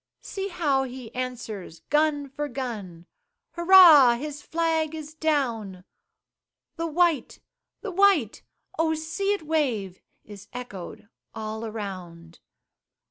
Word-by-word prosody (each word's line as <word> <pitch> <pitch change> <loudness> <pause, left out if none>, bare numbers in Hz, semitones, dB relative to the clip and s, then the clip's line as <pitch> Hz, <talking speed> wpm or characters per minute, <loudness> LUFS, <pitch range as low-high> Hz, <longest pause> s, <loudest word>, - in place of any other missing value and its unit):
See 390 0 -4
how 305 -8 +1
he 255 -3 -7
answers 230 -9 -6
gun 295 -1 +2
for 290 +2 -4
gun 215 -11 -6 0.5
Hurrah! 340 -8 +8
his 295 +3 -6
flag 320 -1 -1
is 310 -1 -8
down! 240 -12 -1 0.9
The 330 0 -3
white! 330 -2 +1 0.4
the 420 - -5
white! 370 - +3 0.4
Oh 320 -1 +2
see 325 +6 -2
it 400 -5 -4
wave! 250 - -1 0.2
Is 205 -2 -12
echoed 225 -7 -8 0.3
all 220 0 -5
around. 185 -6 -8
275 Hz, 110 wpm, -25 LUFS, 220-320 Hz, 0.9 s, Hurrah